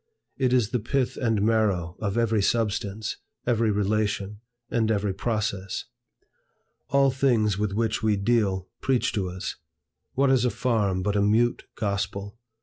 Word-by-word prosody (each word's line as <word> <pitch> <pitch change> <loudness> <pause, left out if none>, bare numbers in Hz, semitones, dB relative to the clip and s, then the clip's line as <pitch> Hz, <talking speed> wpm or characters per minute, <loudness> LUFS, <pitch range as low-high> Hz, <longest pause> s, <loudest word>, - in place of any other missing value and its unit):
It 130 -2 +1
is 120 -4 +2
the 125 - +1
pith 130 +3 -1
and 115 -5 0
marrow 100 -6 +1
of 105 0 -2
every 115 -2 +2
substance, 105 -1 -1 0.3
every 115 -2 +2
relation, 105 0 0 0.3
and 110 -2 +1
every 105 -2 +1
process. 100 -2 -2 1.0
All 140 0 +4
things 115 -7 +2
with 105 -2 -1
which 110 +1 0
we 110 -1 +2
deal, 100 -3 +1
preach 130 -2 +1
to 95 -3 -1
us. 90 +1 -5 0.6
What 135 0 +3
is 130 -3 +3
a 125 - +3
farm 105 -8 0
but 105 +1 0
a 100 - +3
mute 110 +4 +2
gospel? 100 +1 -3
110 Hz, 145 wpm, -26 LUFS, 100-120 Hz, 1.0 s, All